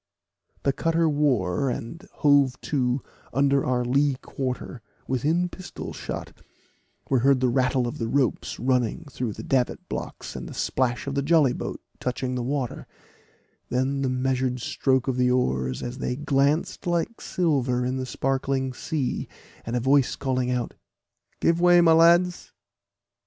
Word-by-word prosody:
The 140 - +2
cutter 165 +1 +1
wore, 135 - +1
and 125 +7 -6
hove 140 -3 +3
to 130 -2 0 0.3
under 140 0 +3
our 125 -1 0
lee 140 +2 +2
quarter, 130 -2 -5 0.3
within 155 +8 +1
pistol 180 0 -8
shot; - - -6 0.8
we 130 - +4
heard 135 +2 +4
the 130 0 +2
rattle 125 0 +1
of 120 - -6
the 115 - -1
ropes 135 +1 0
running 125 +4 0
through 125 -5 -3
the - - -8
davit 130 -2 0
blocks, - - -6
and - - -6
the - - -9
splash 125 -2 0
of 140 - -3
the 140 - 0
jolly 145 -3 +4
boat - - -5 0.2
touching 125 0 -2
the 125 - -2
water, 130 0 -3 0.8
then 130 +2 0
the 135 - +1
measured 130 0 0
stroke 130 +2 0
of 130 -2 0
the 125 0 +3
oars, 65 - 0
as 120 +2 -5
they 125 - -2
glanced 145 +4 0
like 175 +7 -1
silver 130 -8 0
in 130 +1 -1
the 130 0 -3
sparkling 135 0 -1
sea, 135 0 -2 0.4
and 115 - -2
a - - +2
voice 135 +2 +3
calling 130 -2 -1
out, 125 -1 -1 0.7
"Give 170 +1 +2
way, 175 0 +7
my 170 -1 +6
lads." 170 +2 +4
130 Hz, 155 wpm, -25 LUFS, 125-145 Hz, 0.8 s, way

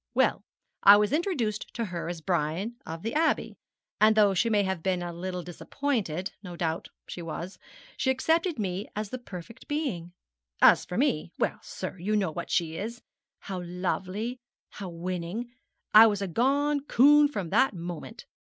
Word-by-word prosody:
Well, - - +2 0.4
I 200 +1 +9
was 210 +4 +1
introduced 290 - -1
to 235 - -1
her 175 -3 -4
as 175 -2 -5
Brian 175 +6 -1
of 165 +1 -6
the 225 - -2
Abbey, 315 +1 +1 0.5
and 215 +1 +6
though 205 -2 +5
she 230 +5 +2
may 210 -2 +3
have 190 -3 -2
been 185 0 0
a 175 0 -5
little 180 +1 -4
disappointed 190 - -3
no 180 -4 -8
doubt 165 -1 -2 0.2
she 175 - -6
was 170 +3 -6 0.4
she 265 - 0
accepted 325 +5 +1
me 195 -1 -3
as 210 -1 -4
the 255 - -4
perfect 220 +1 -10
being. 245 - -3 0.5
As - - +6
for - - -5
me 75 +2 0
well, - - 0
sir, 185 - -7
you 205 +5 0
know 195 -6 +1
what 170 +2 -6
she 165 -2 0
is 230 +6 -5 0.4
how 190 -3 -5
lovely, 185 +6 -3 0.3
how 195 -3 -7
winning. 180 +6 -4 0.4
I 220 +2 +10
was 205 -2 0
a - - -2
gone 280 - +2
coon 290 +3 +6
from 200 - -5
that 240 +1 +3
moment. 170 -2 -7
195 Hz, 170 wpm, -28 LUFS, 175-235 Hz, 0.5 s, I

